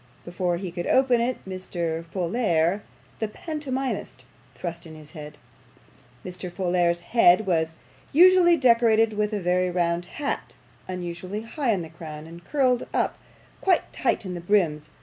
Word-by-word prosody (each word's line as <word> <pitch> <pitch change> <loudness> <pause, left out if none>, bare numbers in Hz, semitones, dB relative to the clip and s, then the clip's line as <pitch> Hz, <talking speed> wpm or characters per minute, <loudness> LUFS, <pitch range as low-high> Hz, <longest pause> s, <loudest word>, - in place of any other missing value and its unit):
Before 175 0 -1
he 180 -1 -5
could 175 0 -4
open 255 -2 +4
it, 245 +2 0
Mr. 170 -3 -3
Folair, 175 0 0 0.4
the 220 - -1
pantomimist, 270 +1 -4 0.3
thrust 170 -1 -6
in 160 - -11
his 155 -1 -13
head. 150 -3 -9 0.9
Mr. 180 0 -7
Folair's 175 -1 +1
head 210 -1 +4
was 160 -3 0 0.4
usually 350 +1 +6
decorated 230 -4 +4
with 210 0 0
a 210 - -1
very 180 0 +1
round 175 -1 0
hat, 285 - -4 0.3
unusually 180 +3 -5
high 255 +3 -3
in 190 -5 0
the 160 - -9
crown, 155 -1 -9
and 170 +1 -12
curled 255 -2 +1
up - - 0 0.4
quite 370 -3 +1
tight - - 0
in 185 - -4
the 175 - -5
brims. 165 -6 +1
185 Hz, 150 wpm, -25 LUFS, 170-230 Hz, 0.9 s, usually